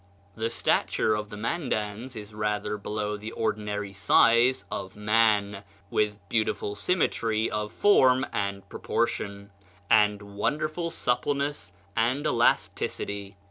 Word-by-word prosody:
"The 115 +1 -2
stature 115 -1 +1
of 105 -1 -3
the 105 - -8
Mandans 115 -2 -3
is 105 -1 -9
rather 105 0 -1
below 105 0 -3
the 110 +2 -7
ordinary 105 -2 -2
size 115 +5 +4
of 95 - -5
man, 105 -2 +2 0.3
with 105 -1 +1
beautiful 110 -2 -1
symmetry 110 - 0
of 105 0 -2
form 130 - +4
and 100 -1 -2
proportion, 100 0 -2 0.4
and 105 -1 +5 0.2
wonderful 155 +8 -1
suppleness 140 - -1 0.2
and 125 +6 +1
elasticity." 100 -5 0
105 Hz, 110 wpm, -27 LUFS, 105-120 Hz, 0.4 s, and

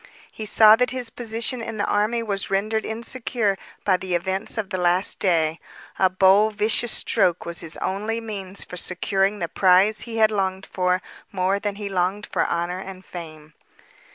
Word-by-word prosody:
He 215 - -6
saw 215 0 +7
that 250 +1 +2
his 250 -3 -3
position 230 +1 -3
in 225 -1 -5
the 205 - 0
army 220 +3 0
was 200 -3 -2
rendered 215 +3 -1
insecure 230 -2 -2 0.3
by 185 -2 +3
the 185 -1 -3
events 190 +5 -2
of 205 -3 -3
the 185 - -2
last 180 +2 +2
day. 165 -4 +2 0.4
A 190 - +4
bold, 195 +3 +4
vicious 220 +2 +1
stroke 180 -6 +1
was 170 -1 -2
his 165 -2 -5
only 210 +4 -2
means 200 -4 -5
for 180 - -9
securing 195 +3 0
the 170 - -2
prize 190 +4 +4
he 230 -1 -5
longed 195 -3 -1
for 180 0 0 0.3
more 190 +1 0
than 205 -1 -3
he 205 0 -5
longed 190 +2 -1
for - - 0
honor 175 +2 -2
and 190 0 -9
fame. 155 -3 -10
195 Hz, 175 wpm, -23 LUFS, 185-220 Hz, 0.4 s, saw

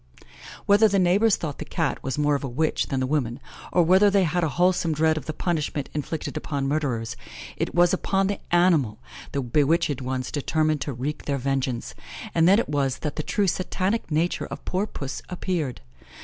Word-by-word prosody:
Whether 205 +2 +6
the 200 -1 +1
neighbours 195 +4 +4
thought 150 -4 -5
the - - -3
Cat - - -2
was 135 0 -3
more 150 0 +2
of 140 - -1
a - - -2
witch 155 +6 0
than 135 - -1
the 130 - 0
woman, 130 -3 -1 0.3
or 175 - +4
whether 190 +5 +5
they 200 -1 +3
had 175 +1 0
a 160 - +1
wholesome 175 0 +2
dread 160 +1 +3
of 155 - -6
the - - -1
punishment 155 -4 -2
inflicted 150 +1 -4
upon 140 -2 -2
murderers, 130 -6 -1 0.4
it - - -3
was 175 0 +5
upon 195 +1 +1
the 200 0 -1
animal 165 -11 +3 0.3
the 140 - -1
bewitched 145 +3 +1
ones 130 0 -3
determined 155 +1 0
to 145 - -2
wreak 140 +5 -4
their 140 -1 0
vengeance, 135 -2 -2 0.4
and 165 0 +4
then 195 +2 +6
it 235 - 0
was 140 -3 0
that 150 - -2
the - - -2
true 200 +6 0
satanic 190 +3 -1
nature 165 +3 0
of - - -8
poor 190 +3 -1
Puss 140 -7 -6
appeared. 175 - -3
155 Hz, 195 wpm, -25 LUFS, 140-180 Hz, 0.4 s, Whether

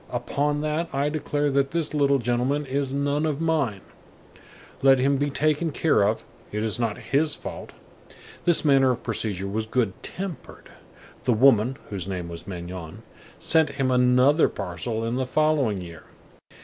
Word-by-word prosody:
Upon 145 +4 -1
that 155 +2 -1
I 140 +2 +1
declare 145 -1 -1
that 135 0 +2
this 160 -1 -1
little 140 -2 +3
gentleman 125 +4 0
is 135 0 -1
none 140 +2 0
of 155 -2 -1
mine. 150 -12 0 1.0
Let 135 0 +6
him 135 +2 +2
be 145 +1 0
taken 155 +3 +1
care 155 -5 +2
of. 105 +2 +1 0.3
It 105 +1 -2
is 110 +1 -1
not 115 -3 -1
his 150 +2 0
fault." - - -8 0.7
This 170 -2 +2
manner 135 -2 +5
of 125 -1 -1
procedure 105 -4 -2
was 110 +2 -3
good 110 -4 0
tempered. 185 -3 -8 0.5
The 125 - +3
woman, 125 +1 +4
whose 95 -3 -3
name 90 -3 -4
was 85 0 -9
Magnon, 90 -3 -7 0.3
sent 160 -1 +3
him 130 -2 +1
another 125 +4 +4
parcel 105 +4 -4
in 115 +2 -1
the 130 -1 -1
following 145 -9 +1
year. 85 -2 -10
135 Hz, 160 wpm, -25 LUFS, 110-145 Hz, 1.0 s, Let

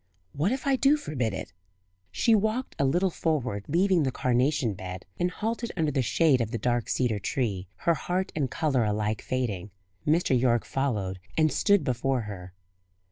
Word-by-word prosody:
What 160 +9 +1
if 260 +1 -2
I 275 -1 +3
do 280 +3 +4
forbid 130 - -2
it?" 95 - -6 0.6
She 230 - +3
walked 220 +4 +1
a 140 - +3
little 175 +7 +2
forward, 125 -13 -1
leaving 180 +3 +3
the 135 -3 +1
carnation 125 -1 +1
bed, 90 -1 -7
and 175 - +2
halted 225 +5 -3
under 155 -3 +1
the 135 -1 +1
shade 135 +1 +3
of 115 - -1
the 115 - -2
dark 120 +1 0
cedar 120 -5 +1
tree, 100 -3 -2
her 170 - +1
heart 180 +3 -2
and 140 -4 0
colour 140 -5 +1
alike 105 0 -1
fading. 105 -7 -2 0.4
Mr. 155 -3 +3
Yorke 120 -2 +2
followed 105 -9 -2 0.2
and 155 -1 +4
stood 200 +5 +3
before 130 0 0
her. 95 -4 -8
135 Hz, 175 wpm, -27 LUFS, 110-170 Hz, 0.6 s, do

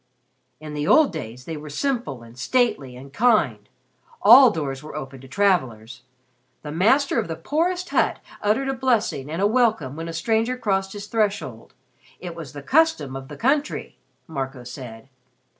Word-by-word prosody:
"In 155 -1 -8
the 150 0 -2
old 310 -9 +5
days 125 -5 -7
they 165 - -5
were 150 0 -8
simple 150 - -2
and 115 0 -14
stately 140 - 0
and 135 +2 -12
kind. 155 - +2 0.5
All 245 +5 +9
doors 140 -8 -4
were 155 - -10
open 135 -1 -7
to 135 - -13
travelers. 130 - 0 0.6
The 150 - -6
master 230 - +3
of 220 - -2
the 165 - -4
poorest 345 - -1
hut - - +1 0.2
uttered 220 +6 +1
a - - 0
blessing 235 - 0
and 165 +5 -2
a - - +5
welcome 215 - +1
when 165 +1 -6
a 165 - -5
stranger 225 +8 0
crossed 195 -4 -1
his 205 -1 -7
threshold. 205 - -2 0.4
It 175 -1 -7
was 160 -5 -9
the 145 -1 -8
custom 255 - +2
of 135 0 -7
the 145 0 -10
country," 285 - -1 0.3
Marco 135 -4 -5
said. 120 -2 -9
165 Hz, 170 wpm, -23 LUFS, -, 0.6 s, All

